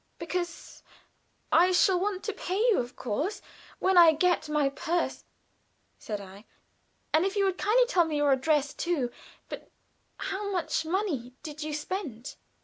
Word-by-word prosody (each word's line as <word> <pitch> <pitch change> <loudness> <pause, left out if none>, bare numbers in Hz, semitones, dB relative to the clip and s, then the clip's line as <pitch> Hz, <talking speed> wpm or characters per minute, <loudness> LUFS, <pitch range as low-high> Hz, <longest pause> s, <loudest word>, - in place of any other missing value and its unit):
"Because 345 +1 -5 0.7
I 350 +3 +5
shall 365 0 +4
want 390 0 -2
to 425 - -3
pay 370 +1 -3
you, 455 0 +3
of 245 0 -4
course, 300 - -2 0.4
when 375 -1 +4
I 330 -2 +8
get 330 -1 +1
my 300 -2 +2
purse," 335 +5 -2 0.7
said 210 -2 -5
I. 200 +2 -12 0.7
"And 315 - +4
if 390 +2 -1
you 400 -1 +2
will 385 - +2
kindly 445 +6 +3
tell 370 -8 +3
me 310 -2 -2
your 290 -1 +3
address, 285 +1 +2
too 295 -9 -1 0.4
but - - -8 0.5
how 400 +1 -3
much 345 -3 -1
money 320 - -2
did 305 0 -7
you 300 0 -3
spend?" 300 - -5
335 Hz, 155 wpm, -28 LUFS, 290-380 Hz, 0.7 s, I